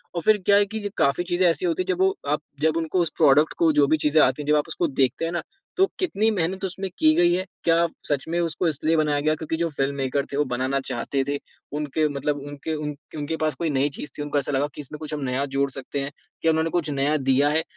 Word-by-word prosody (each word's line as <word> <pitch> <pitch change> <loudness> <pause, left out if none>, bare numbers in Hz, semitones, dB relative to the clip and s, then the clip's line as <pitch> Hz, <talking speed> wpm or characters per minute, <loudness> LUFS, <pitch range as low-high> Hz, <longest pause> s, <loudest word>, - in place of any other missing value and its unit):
और 170 - -1
फिर 215 +5 +4
क्या 200 - +6
है 205 - +4
कि 220 +2 -5 0.2
काफ़ी 140 +5 +2
चीज़ें 175 +1 +2
ऐसी 165 - 0
होती 170 +1 0
है - - -15
जब 185 -1 0
वो 190 0 +4 0.2
आप 150 - +1 0.2
जब 160 0 +2
उनको 165 +2 0
उस 170 - 0
प्रोडक्ट 150 0 +5
को 165 -2 +4
जो 145 -1 +5
भी 155 - +3
चीज़ें 150 +1 +3
आती 130 +3 +1
हैं, - - -11
जब 150 - +4
आप 150 +1 +1
उसको 165 +1 -1
देखते 135 +2 0
हैं 165 - -2
ना, 175 - -1 0.4
तो 380 - +6
कितनी 220 - +1
मेहनत 190 0 -1
उसमें 190 +1 -4
की 155 0 +5
गई 175 +1 +4
है, 185 +1 0 0.2
क्या 170 0 +4 0.2
सच 145 -2 0
में 170 +1 0
उसको 170 +1 0
इसलिए 155 +1 +1
बनाया 150 -2 +2
गया 155 +2 +1
क्योंकि 160 +1 -3
जो 170 0 0
फ़िल्ममेकर 140 -1 -1
थे, 140 - -1
वो 150 - +2
बनाना 130 +2 -1
चाहते 135 0 -2
थे, 145 0 0 0.4
उनके 150 +1 0
मतलब 145 +1 -1
उनके 145 +2 -5
उन 150 -1 -4 0.2
उनके 150 +2 -3
पास 155 -1 0
कोई 170 -2 -1
नई 140 0 +2
चीज़ 150 - -7
थी, - - -4
उनको 145 0 -2
ऐसा 140 - 0
लगा 140 +1 +1
कि - - -6
इसमें 145 +2 -9
कुछ 155 -1 -5
हम 150 - -3
नया 130 +1 -1
जोड़ 140 0 +2
सकते 135 +1 -5
हैं, 140 +1 -4 0.3
क्या 165 - +3
उन्होंने 160 +1 +1
कुछ 170 -2 -1
नया 140 +2 +1
दिया 135 +1 +3
है? 160 +2 +1
155 Hz, 265 wpm, -24 LUFS, 140-170 Hz, 0.4 s, क्या